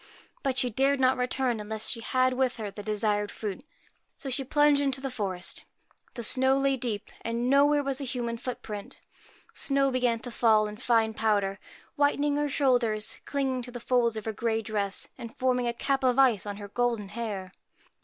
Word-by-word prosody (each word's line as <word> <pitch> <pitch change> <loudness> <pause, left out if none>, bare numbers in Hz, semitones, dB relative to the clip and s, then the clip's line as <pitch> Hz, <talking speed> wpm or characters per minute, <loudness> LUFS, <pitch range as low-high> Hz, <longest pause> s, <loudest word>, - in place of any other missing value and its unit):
But 265 -2 -1
she 250 -1 +2
dared 270 +4 +2
not 260 0 +4
return 250 -1 0
unless 215 +1 -3
she 230 - -2
had 255 +2 +1
with 255 0 0
her 210 -3 -4
the 205 - -8
desired 210 0 0
fruit. 215 +4 -5 0.5
So 270 - -5
she 270 +2 +2
plunged 295 +1 +4
into 270 -2 +1
the 270 -1 -4
forest. 195 -7 -2 0.5
The 235 - -4
snow 265 +4 +2
lay 275 0 +2
deep, 235 -5 -3
and 235 +2 -1
nowhere 290 +1 +5
was 275 0 -2
a - - -2
human 240 -3 -3
footprint. 225 -4 -6 0.6
Snow 275 -1 +1
began 250 -2 +1
to 245 - -6
fall 220 -2 +4
in 210 0 -6
fine 225 -2 +2
powder, 205 -3 +1 0.4
whitening 285 0 +2
her 295 0 0
shoulders, 245 -6 +1
clinging 270 -3 -1
to 245 - -8
the 245 - -6
folds 235 -2 +1
of 215 - -5
her 220 - -2
grey 225 0 -1
dress, 205 -2 -1
and 235 +3 -8
forming 250 -2 +1
a - - +2
cap 270 +3 -1
of 250 -1 +3
ice 240 -8 +4
on 205 -1 -4
her 205 -1 -7
golden 230 -3 -1
hair. 205 -5 -5
245 Hz, 190 wpm, -28 LUFS, 215-265 Hz, 0.6 s, nowhere